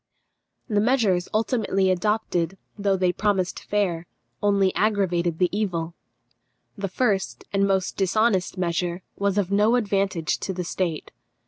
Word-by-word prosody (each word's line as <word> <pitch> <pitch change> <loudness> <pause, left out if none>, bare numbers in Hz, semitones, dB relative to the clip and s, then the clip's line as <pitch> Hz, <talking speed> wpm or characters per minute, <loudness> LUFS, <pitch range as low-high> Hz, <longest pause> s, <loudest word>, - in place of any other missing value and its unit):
The 210 -4 +1
measures 215 -7 +2
ultimately 215 -4 +1
adopted, 190 -2 0 0.2
though 200 -2 +1
they 180 -1 +2
promised 195 -3 0
fair, 180 -5 -1 0.3
only 200 -2 +3
aggravated 180 -6 +1
the 180 - +3
evil. 175 -6 -2 0.8
The 195 0 -3
first, 200 -1 0
and 200 0 +3
most 190 -1 0
dishonest 195 -1 +1
measure 175 0 -1
was 200 0 0
of 200 -2 0
no 210 +4 +4
advantage 195 -7 0
to 190 - -3
the 180 0 -3
state. 170 -2 -3
195 Hz, 130 wpm, -24 LUFS, 180-210 Hz, 0.8 s, no